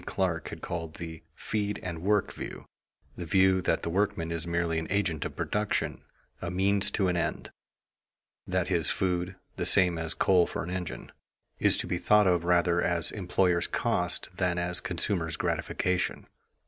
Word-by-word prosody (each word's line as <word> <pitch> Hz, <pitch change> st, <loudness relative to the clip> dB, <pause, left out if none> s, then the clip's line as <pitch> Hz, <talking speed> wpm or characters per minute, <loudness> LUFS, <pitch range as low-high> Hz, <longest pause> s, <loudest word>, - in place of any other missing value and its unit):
Clark 85 Hz, -4 st, -1 dB
has -, -, -7 dB
called 80 Hz, -2 st, -5 dB
the 80 Hz, -2 st, -7 dB
"feed 105 Hz, -1 st, -2 dB
and 85 Hz, -3 st, -5 dB
work" 100 Hz, +2 st, +1 dB
view, -, -, -7 dB, 0.5 s
the 85 Hz, -, -6 dB
view 95 Hz, +1 st, +4 dB
that -, -, 0 dB
the -, -, -2 dB
workman 85 Hz, -3 st, 0 dB
is 85 Hz, 0 st, -3 dB
merely 85 Hz, -1 st, 0 dB
an 80 Hz, -, -5 dB
agent 95 Hz, -6 st, 0 dB
of -, -, -5 dB
production, 105 Hz, 0 st, -1 dB, 0.4 s
a 85 Hz, -, -3 dB
means 100 Hz, +2 st, +2 dB
to 100 Hz, -2 st, +1 dB
an 90 Hz, -, +1 dB
end; 85 Hz, -, -2 dB, 1.0 s
that 90 Hz, -1 st, 0 dB
his 85 Hz, -4 st, +2 dB
food, 90 Hz, 0 st, -1 dB, 0.2 s
the 90 Hz, -, -1 dB
same 90 Hz, -2 st, +4 dB
as 80 Hz, 0 st, +1 dB
coal 90 Hz, -2 st, +4 dB
for -, -, -4 dB
an 90 Hz, -, -6 dB
engine, 90 Hz, -2 st, -5 dB, 0.5 s
is -, -, +5 dB
to -, -, 0 dB
be 90 Hz, -, -2 dB
thought 105 Hz, +2 st, +4 dB
of 90 Hz, -2 st, +3 dB
rather 85 Hz, 0 st, +3 dB
as 85 Hz, -2 st, +2 dB
employer's 90 Hz, -3 st, +1 dB
cost 90 Hz, 0 st, 0 dB
than 90 Hz, -2 st, 0 dB
as 90 Hz, 0 st, +1 dB
consumer's 85 Hz, -2 st, -1 dB
gratification. 90 Hz, -1 st, -1 dB
90 Hz, 170 wpm, -29 LUFS, 85-95 Hz, 1.0 s, is